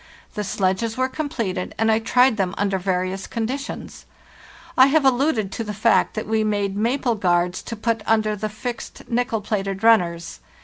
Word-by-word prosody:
The 210 - -3
sledges 200 +3 -1
were 260 0 +2
completed, 235 -11 -3
and 225 0 +2
I 220 - +3
tried 250 +2 +3
them 190 -3 -1
under 195 -1 0
various 185 +1 -2
conditions. 255 +5 -5 0.7
I 260 -1 +7
have 290 0 +3
alluded 250 -6 +2
to 230 - -4
the 210 -1 -5
fact 220 +2 +2
that 215 - -3
we 220 0 +1
made 205 -2 -1
maple 240 +4 +1
guards 180 -3 +1
to 230 - -6
put 225 0 -1
under 215 -1 +2
the 215 +1 -3
fixed 235 +3 -7
nickel 240 -2 -1
plated 195 -1 -3
runners. 170 - +2
215 Hz, 170 wpm, -22 LUFS, 195-235 Hz, 0.7 s, I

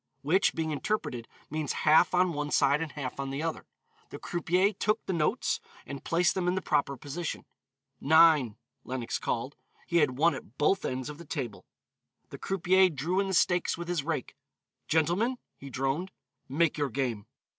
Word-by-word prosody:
_" - - -60 0.2
Which, 180 +7 +2
being 160 -1 -1
interpreted, 145 - -2 0.2
means 155 -2 -2
half 160 +4 +5
on 180 -1 +3
one 145 0 -3
side 140 +1 +3
and 160 -2 -4
half 135 -2 -5
on 135 0 -3
the 140 +3 -3
other. 165 -1 -4 0.4
The - - -8
croupier 180 +4 +1
took 215 +3 -1
the 190 - -2
notes, 155 -3 0 0.3
and 140 -1 -7
placed 170 0 +2
them 185 -2 -1
in 180 - +2
the 190 - -1
proper 140 -3 0
position. 145 +6 -5 0.5
"Nine," 155 -7 +5 0.3
Lenox 125 -2 -3
called; 125 +4 -3 0.3
he 170 - 0
had 145 -6 +2
won 165 +3 +4
at 130 -2 -10
both 190 +6 +2
ends 130 0 -3
of 150 +1 -8
the - - -8
table. 130 -8 -5 0.6
The - - -8
croupier 190 0 +3
drew 165 +5 -1
in 200 - +1
the 190 - 0
stakes 175 0 +2
with 170 0 -6
his 175 -4 -1
rake. 155 -4 -3 0.5
"Gentlemen," 175 +11 +1 0.2
he 140 - -10
droned, 135 +8 -1 0.4
"make 150 +2 +1
your 145 -2 0
game." 120 -4 -2
155 Hz, 180 wpm, -29 LUFS, 135-175 Hz, 0.6 s, half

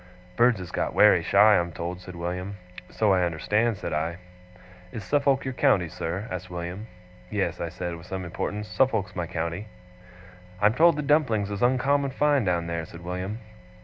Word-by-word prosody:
'Birds 120 -1 +4
is 90 -1 -8
got - - -2
wery - - +6
shy, 105 +1 +5
I'm 85 0 -2
told,' 85 +2 -5
said 90 -1 -10
William. 90 +3 -4 0.3
'So 105 -3 +2
I 95 - +3
understand,' 105 +7 0
said - - -5
I. 80 +3 -2 0.7
'Is 110 - -6
Suffolk 140 0 +1
your 130 - -3
county, 125 -10 +3
sir?' 90 +8 -4
asked 90 0 -5
William. 90 +4 -6 0.4
'Yes,' 95 -5 -2
I 85 - -2
said, 90 0 -5
with 85 +1 -12
some 95 -1 -4
importance. 105 +4 -4
'Suffolk's 110 -9 0
my 85 -2 -3
county.' 85 +4 -4 0.9
'I'm 105 +2 +4
told 165 +5 +5
the 150 - -3
dumplings 130 -9 +2
is 100 - -4
uncommon 135 +3 +2
fine 145 0 +2
down 85 -2 0
there,' 85 -1 -4
said 85 - -11
William. 90 +5 -4
95 Hz, 180 wpm, -26 LUFS, 85-120 Hz, 0.9 s, wery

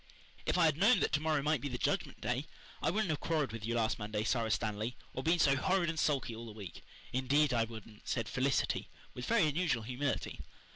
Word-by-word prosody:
"If - - +2
I 175 - +5
had 155 -2 +3
known 220 +6 +6
that - - +2
to 145 - +2
morrow 155 -2 +1
might 155 +1 +1
be 145 - -2
the 125 - -3
Judgment - - -1
Day - - -1 0.3
I - - +2
wouldn't 190 -1 +1
have 150 - -1
quarrelled 155 -7 0
with 115 -1 -6
you 115 +2 -1
last 115 -1 +1
Monday, 105 0 -2
Sara 115 0 +1
Stanley, 110 +2 -1 0.2
or - - -3
been 165 +4 +3
so 140 -4 +4
horrid 180 +4 +2
and 160 - -4
sulky 135 -6 +1
all 115 +1 -8
the 110 - -8
week. 100 -5 -9 0.3
Indeed 135 +2 +3
I 115 -1 +3
wouldn't," 110 -1 -11
said - - -1
Felicity, - - 0 0.2
with 125 - -6
very 225 -8 +4
unusual 150 -6 +1
humility. 130 +5 -2
135 Hz, 225 wpm, -34 LUFS, 115-160 Hz, 0.3 s, known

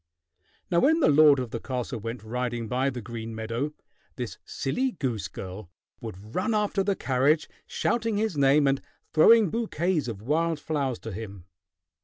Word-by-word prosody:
Now 170 - +4
when 320 - +4
the 310 - +4
lord 150 -1 +7
of 125 -3 -3
the 115 - -3
castle 125 -1 -4
went 115 +1 -6
riding 120 0 -3
by 130 +4 +1
the 125 -3 -6
green 115 +1 -6
meadow, 115 +6 -2 0.4
this - - -5
silly 255 - -1
goose 120 - -2
girl 95 -1 -8 0.3
would 110 -1 -9
run 215 +4 0
after 210 -1 +1
the 200 0 +1
carriage, 140 +3 +2 0.2
shouting 230 -3 0
his 215 -4 0
name 140 +1 +4
and 135 0 +1 0.3
throwing 210 +4 +6
bouquets 180 - 0
of 105 -3 -6
wild 160 +4 +1
flowers 140 -5 -1
to 115 - -6
him. 100 -3 -8
135 Hz, 165 wpm, -27 LUFS, 115-170 Hz, 0.4 s, lord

